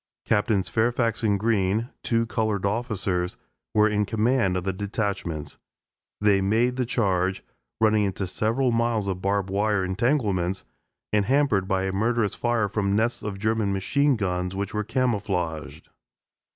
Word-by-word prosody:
Captains 105 Hz, -2 st, +1 dB
Fairfax 115 Hz, 0 st, +1 dB
and 105 Hz, -3 st, +2 dB
Green, 110 Hz, +1 st, +1 dB
two 115 Hz, -1 st, +1 dB
colored 110 Hz, -4 st, -1 dB
officers, 100 Hz, -5 st, -1 dB, 0.3 s
were 105 Hz, 0 st, +4 dB
in 105 Hz, -1 st, +1 dB
command 110 Hz, -3 st, +1 dB
of 90 Hz, -, -3 dB
the 95 Hz, 0 st, -1 dB
detachments. 100 Hz, -6 st, -3 dB, 0.6 s
They 105 Hz, -2 st, +3 dB
made 115 Hz, +6 st, +2 dB
the 125 Hz, -2 st, -1 dB
charge, 95 Hz, -5 st, 0 dB, 0.4 s
running 110 Hz, -1 st, +3 dB
into 95 Hz, 0 st, -2 dB
several 115 Hz, +7 st, 0 dB
miles 115 Hz, -3 st, +1 dB
of 95 Hz, -1 st, -3 dB
barb 100 Hz, -1 st, 0 dB
wire 100 Hz, -1 st, +1 dB
entanglements, 95 Hz, -4 st, 0 dB, 0.5 s
and 105 Hz, -1 st, +3 dB
hampered 130 Hz, -8 st, +2 dB
by 95 Hz, -1 st, +1 dB
a 95 Hz, -, -1 dB
murderous 110 Hz, +2 st, +1 dB
fire 120 Hz, -3 st, 0 dB
from 100 Hz, -1 st, 0 dB
nests 120 Hz, +3 st, +1 dB
of 105 Hz, -2 st, -4 dB
German 110 Hz, -1 st, 0 dB
machine 140 Hz, +9 st, +2 dB
guns 90 Hz, -3 st, -2 dB
which 100 Hz, 0 st, -3 dB
were 105 Hz, 0 st, -1 dB
camouflaged. 100 Hz, -, -2 dB
105 Hz, 145 wpm, -25 LUFS, 95-115 Hz, 0.6 s, were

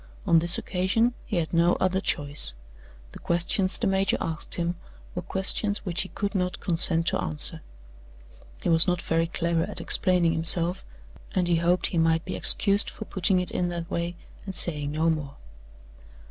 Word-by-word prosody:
On 165 Hz, -, +4 dB
this 170 Hz, +2 st, +6 dB
occasion 200 Hz, +6 st, -1 dB
he 215 Hz, -, -4 dB
had 170 Hz, -2 st, -2 dB
no 170 Hz, +1 st, +3 dB
other 190 Hz, +1 st, -1 dB
choice. 145 Hz, -, 0 dB, 0.6 s
The -, -, -12 dB
questions 175 Hz, +2 st, -2 dB
the 235 Hz, -, -3 dB
major 195 Hz, 0 st, +1 dB
asked 160 Hz, -2 st, -2 dB
him 170 Hz, 0 st, -2 dB, 0.4 s
were 180 Hz, -, -4 dB
questions 195 Hz, +3 st, -2 dB
which 180 Hz, -2 st, -1 dB
he 185 Hz, -, -6 dB
could 200 Hz, +1 st, -4 dB
not 180 Hz, -2 st, -2 dB
consent 165 Hz, -1 st, +1 dB
to -, -, -2 dB
answer. 155 Hz, +2 st, -2 dB, 1.0 s
He -, -, -1 dB
was 165 Hz, +2 st, +4 dB
not 180 Hz, -1 st, 0 dB
very 165 Hz, 0 st, -1 dB
clever 170 Hz, -1 st, -1 dB
at -, -, -5 dB
explaining 180 Hz, -3 st, +1 dB
himself, 170 Hz, +2 st, +5 dB, 0.5 s
and 180 Hz, -2 st, 0 dB
he 170 Hz, -1 st, +1 dB
hoped 170 Hz, +1 st, 0 dB
he 170 Hz, -, 0 dB
might 165 Hz, 0 st, +1 dB
be -, -, -5 dB
excused 200 Hz, +1 st, +3 dB
for 220 Hz, -, -9 dB
putting 190 Hz, -1 st, +1 dB
it 180 Hz, -, +5 dB
in 175 Hz, -1 st, -2 dB
that 170 Hz, +1 st, -6 dB
way, 170 Hz, +1 st, -3 dB, 0.3 s
and 195 Hz, -2 st, -8 dB
saying 150 Hz, -5 st, +2 dB
no 160 Hz, +2 st, 0 dB
more. 145 Hz, -3 st, -5 dB
175 Hz, 175 wpm, -25 LUFS, 165-185 Hz, 1.0 s, this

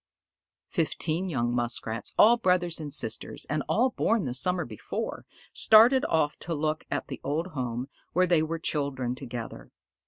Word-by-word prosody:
Fifteen 165 Hz, +2 st, -1 dB
young 120 Hz, -6 st, -1 dB
Muskrats, 120 Hz, -1 st, -2 dB
all 230 Hz, +3 st, +7 dB
brothers 180 Hz, -6 st, +1 dB
and 150 Hz, -2 st, -6 dB
sisters, 110 Hz, -4 st, -1 dB
and 150 Hz, 0 st, 0 dB
all 250 Hz, +3 st, +2 dB
born 225 Hz, -6 st, +1 dB
the 125 Hz, -, -3 dB
summer 175 Hz, +7 st, +1 dB
before, 110 Hz, -3 st, -6 dB, 0.3 s
started 235 Hz, +5 st, +6 dB
off 150 Hz, -2 st, 0 dB
to 165 Hz, -1 st, -3 dB
look 155 Hz, +1 st, -1 dB
at -, -, -2 dB
the -, -, -7 dB
old 150 Hz, +4 st, -1 dB
home 125 Hz, -2 st, -3 dB, 0.2 s
where 185 Hz, +2 st, +3 dB
they 170 Hz, -3 st, +3 dB
were 160 Hz, +1 st, -2 dB
children 140 Hz, -6 st, -2 dB
together. 120 Hz, -, -7 dB
155 Hz, 155 wpm, -27 LUFS, 125-180 Hz, 0.3 s, all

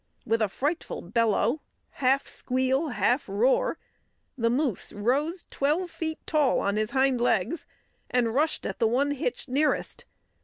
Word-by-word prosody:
With 225 Hz, 0 st, +1 dB
a 215 Hz, -, +2 dB
frightful 295 Hz, -, -3 dB
bellow, 230 Hz, -, +1 dB, 0.3 s
half 270 Hz, +1 st, +1 dB
squeal, 260 Hz, +4 st, 0 dB
half 245 Hz, 0 st, +1 dB
roar, 260 Hz, -, +2 dB, 0.6 s
the 230 Hz, -3 st, +1 dB
moose 255 Hz, -, 0 dB
rose 280 Hz, -, 0 dB
twelve 320 Hz, +6 st, 0 dB
feet 315 Hz, -1 st, -3 dB
tall 300 Hz, -4 st, +2 dB
on 200 Hz, +1 st, 0 dB
his 215 Hz, 0 st, 0 dB
hind 265 Hz, -1 st, +2 dB
legs, 240 Hz, -, 0 dB, 0.4 s
and 235 Hz, -3 st, +1 dB
rushed 300 Hz, +5 st, +1 dB
at -, -, -4 dB
the 230 Hz, -, +4 dB
one 270 Hz, +5 st, +1 dB
hitched 300 Hz, -, -3 dB
nearest. 290 Hz, +4 st, 0 dB
260 Hz, 145 wpm, -27 LUFS, 230-300 Hz, 0.6 s, the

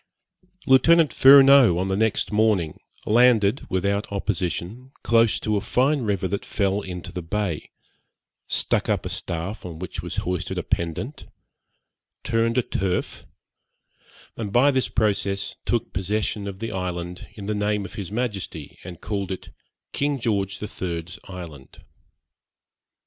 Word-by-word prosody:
Lieutenant 160 Hz, +4 st, +5 dB
Furneaux, 135 Hz, -7 st, +8 dB
on 90 Hz, -, 0 dB
the 95 Hz, 0 st, 0 dB
next 110 Hz, +1 st, +1 dB
morning, 105 Hz, -7 st, +1 dB, 0.3 s
landed, 115 Hz, 0 st, +4 dB
without 100 Hz, +3 st, -1 dB
opposition, 100 Hz, -, -3 dB
close 115 Hz, -2 st, +3 dB
to 105 Hz, -1 st, 0 dB
a -, -, -1 dB
fine 130 Hz, +7 st, +1 dB
river 100 Hz, -4 st, -1 dB
that 100 Hz, +2 st, -3 dB
fell 100 Hz, 0 st, 0 dB
into 90 Hz, -3 st, -7 dB
the 90 Hz, -, -5 dB
bay 90 Hz, -1 st, -3 dB, 0.8 s
stuck -, -, 0 dB
up -, -, 0 dB
a -, -, -3 dB
staff 85 Hz, +6 st, -4 dB
on 85 Hz, -3 st, -7 dB
which 90 Hz, +2 st, -6 dB
was -, -, -5 dB
hoisted 90 Hz, -1 st, -2 dB
a -, -, -2 dB
pendant, 85 Hz, -, -3 dB, 1.0 s
turned 115 Hz, +1 st, +1 dB
a 125 Hz, -, +3 dB
turf, 95 Hz, -4 st, -3 dB, 1.1 s
and 105 Hz, -3 st, -4 dB
by 130 Hz, +6 st, +5 dB
this 130 Hz, -2 st, +1 dB
process 100 Hz, -3 st, 0 dB
took -, -, -1 dB
possession 100 Hz, +2 st, -1 dB
of 100 Hz, -1 st, -6 dB
the 115 Hz, +3 st, -5 dB
island 90 Hz, -1 st, -4 dB
in 100 Hz, -, -8 dB
the 105 Hz, -, -1 dB
name 105 Hz, 0 st, 0 dB
of -, -, -10 dB
his 100 Hz, -2 st, -6 dB
Majesty, 105 Hz, -, -4 dB
and 90 Hz, -1 st, -9 dB
called 100 Hz, -3 st, -3 dB
it 95 Hz, -, -6 dB, 0.4 s
King 145 Hz, -1 st, 0 dB
George 100 Hz, -4 st, -1 dB
the 105 Hz, -, -5 dB
Third's 85 Hz, -3 st, -5 dB
Island. 85 Hz, -8 st, -10 dB
100 Hz, 145 wpm, -24 LUFS, 90-115 Hz, 1.1 s, Furneaux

